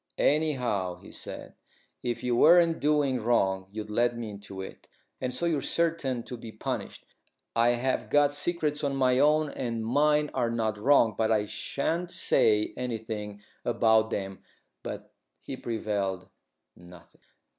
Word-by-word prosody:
"Anyhow," 125 - +1
he - - -13
said, - - -7 0.5
"if 120 0 -3
you 125 -1 +1
weren't 165 +4 +5
doing 145 -4 +1
wrong, 95 -5 +1
you'd 105 0 -6
let 120 +2 +1
me 115 -3 -5
into 100 -1 -9
it, 95 - -9 0.3
and 130 -1 -1
so 125 +7 -2
you're 160 -4 +1
certain 160 -8 0
to 125 - -7
be 115 -1 -9
punished. - - -5 0.5
I 120 +1 +4
have 130 +2 -1
got 145 -1 +4
secrets 150 -1 -1
of 140 -2 -1
my 130 -1 +3
own 150 +1 +3
and 115 -3 -3
mine 150 +4 +2
are 120 -3 0
not 110 -2 -1
wrong, 120 -2 +4
but 110 +1 +1
I 105 -2 +2
shan't 165 +10 -2
say 110 -11 +2
anything 110 -4 -5 0.2
about 110 -2 +3
them." 95 -3 -4 0.4
But - - -7 0.3
he - - -7
prevailed 100 -5 -3 0.5
nothing. 90 0 -16
120 Hz, 145 wpm, -28 LUFS, 110-145 Hz, 0.5 s, weren't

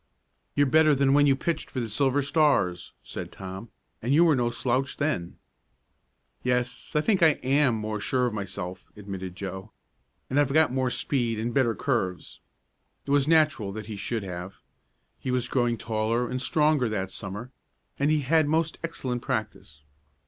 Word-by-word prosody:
"You're 145 - +4
better 155 +2 +5
than 135 0 +3
when 145 0 +5
you 135 - +5
pitched 160 +3 -3
for 130 - -4
the 120 - -2
Silver 135 +5 +1
Stars," 140 - +1
said - - -7
Tom, 95 +4 -8 0.3
"and 120 - -2
you 160 +5 +6
were 160 -3 +5
no 120 -2 +1
slouch 130 +2 -1
then." 140 - -2 1.0
"Yes, 125 0 -1
I 150 - +4
think 195 +2 +1
I 160 -2 +5
am 135 -2 +3
more 110 0 -3
sure 125 +4 +1
of 120 - -1
myself," 100 -3 -6
admitted 95 -3 -6
Joe. 95 +2 -6 0.6
"And 135 - +1
I've 145 -2 +2
got 155 -4 +4
more 130 -1 +1
speed 120 -3 -1
and 115 +2 -2
better 120 -5 +2
curves." 95 -10 -2 0.7
It 140 - -4
was 140 0 +3
natural 155 -10 +3
that 110 0 -6
he 110 - -6
should 105 +2 -3
have. 90 +1 -6 0.6
He - - -5
was 125 -1 0
growing 120 -2 +1
taller 115 +2 -1
and 130 0 -2
stronger 150 -1 +2
that 95 -3 -3
Summer, 105 +6 -7 0.5
and 140 +1 +2
he 155 -1 +2
had 155 +2 +3
most 160 +1 0
excellent 130 -7 -3
practice. 110 - -4
125 Hz, 170 wpm, -27 LUFS, 105-145 Hz, 1.0 s, you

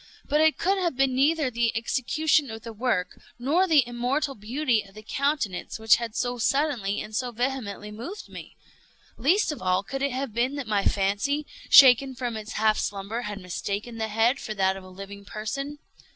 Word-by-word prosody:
But 300 +2 +2
it 315 0 +4
could 390 +2 +1
have 345 -6 0
been 270 -1 +2
neither 285 +1 +2
the 235 -1 0
execution 280 +5 +1
of 220 0 -8
the 230 - -7
work, 215 -5 -1 0.2
nor 305 +10 +2
the 295 -7 +4
immortal 255 +4 -1
beauty 235 +2 0
of 195 -1 -17
the 215 - -10
countenance, 280 -7 -2
which 220 -1 +5
had 235 -2 -5
so 245 0 -1
suddenly 250 -6 0
and 215 0 -7
so 250 +1 -1
vehemently 235 -4 -3
moved 255 - -8
me. - - -11 0.6
Least 335 - +2
of 300 - -7
all, 185 +1 +1
could 270 +6 -5
it 280 0 +1
have 260 -2 -3
been 245 +5 0
that 285 -3 -4
my 210 -2 0
fancy, 205 +10 0 0.2
shaken 265 0 +8
from 240 -1 -3
its 215 0 -6
half 215 0 +2
slumber, 205 +4 -3
had 210 -3 -5
mistaken 200 +5 -4
the 220 - -1
head 225 +5 +2
for 215 - -5
that 190 -1 +2
of 195 - -9
a 185 - -12
living 195 +2 -10
person. 275 +9 -5
240 Hz, 195 wpm, -26 LUFS, 210-275 Hz, 0.6 s, shaken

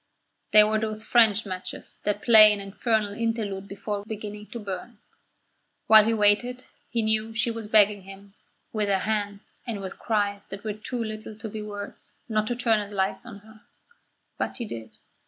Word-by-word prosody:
They 215 - +9
were 215 +1 +1
those 215 0 -4
French 225 -2 +4
matches 185 -2 -7
that 205 0 -1
play 220 -3 +8
an 210 - -1
infernal 205 +1 -1
interlude 215 -4 -2
before 200 +1 -4
beginning 210 -1 -7
to 235 - -7
burn. 210 +3 -6 0.9
While 215 -1 +8
he 225 - +2
waited 225 +4 +2 0.2
he 230 -2 0
knew 220 0 +1
that 225 0 -9
she 230 +2 +1
was 225 -2 -5
begging 210 -1 +4
him, 195 +1 -13 0.4
with 210 -2 0
her 195 - +3
hands 205 -1 -3
and 225 -4 -3
with 190 -1 -7
cries 205 -3 -1
that 195 +1 -8
were 215 -1 -2
too 230 +3 -4
little 215 0 -7
to 220 - -6
be 215 0 -6
words, 205 -1 -8
not 215 -2 0
to 245 - -1
turn 230 -3 +2
its 205 0 -6
light 195 +4 -1
on 205 -4 -10
her. 215 0 -17 0.8
But - - -2
he 240 - -4
did. 115 - -8
215 Hz, 185 wpm, -26 LUFS, 205-220 Hz, 0.9 s, They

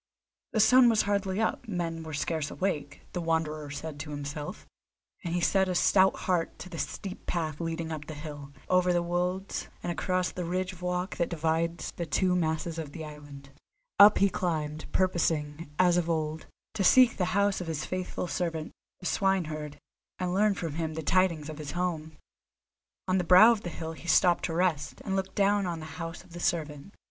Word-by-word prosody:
The 220 - +1
sun 245 +3 +7
was 220 -2 +3
hardly 200 -1 0
up, 225 +2 -1
men 170 -5 -3
were 160 -2 -6
scarce 155 0 -1
awake, 150 -6 -3
the 180 - -2
Wanderer 155 -2 -1
said 145 +1 -6
to 150 +1 -6
himself; 145 0 -6 0.6
and 170 0 -2
he 175 - 0
set 190 +2 +3
a 180 - -1
stout 190 +2 +4
heart 175 -3 0
to 185 - -9
the 165 -3 -7
steep 195 -2 -5
path 155 -4 -2
leading 165 0 -3
up 150 -2 -6
the 155 - -6
hill, 145 -2 -8 0.2
over 180 0 +3
the 175 0 +1
wolds, 180 +2 -2 0.2
and 175 - -1
across 185 +1 0
the 180 - -4
ridge 185 +2 -2
of 180 - -14
rock 180 +1 -2
that 170 - 0
divides 165 +1 -1
the 170 - -3
two 180 +5 +2
masses 165 -1 -1
of 150 -3 -6
the 160 -2 -6
island. 145 -2 -11 0.5
Up 205 +1 +9
he 200 - +5
climbed, 155 -5 -3
purposing, 165 -4 0
as 180 -1 +4
of 170 -1 0
old, 155 -1 -2 0.3
to 215 -3 -1
seek 250 +4 +6
the 180 - +1
house 200 -1 +2
of 175 - -5
his 155 -2 -3
faithful 185 0 -3
servant, 165 -3 -3 0.3
the - - -9
swineherd, 155 -7 0 0.4
and 180 -1 -2
learn 205 +1 +3
from 165 -5 -4
him 160 0 -3
the 160 - -4
tidings 170 -3 +2
of 155 -1 -7
his 145 -1 -6
home. 165 -3 -3 0.9
On 185 0 +2
the - - 0
brow 185 +6 +8
of 220 -3 -1
a - - -2
hill 160 0 -6
he 165 - -12
stopped 175 -1 +4
to 165 - -3
rest, 165 -5 0
and 195 - -1
looked 190 0 -3
down 200 -1 +2
on 170 -2 -3
the 155 - -7 0.2
house 165 +1 -6
of 180 -2 -18
the 175 - -7
servant. 155 -1 -2
170 Hz, 200 wpm, -29 LUFS, 155-185 Hz, 0.9 s, Up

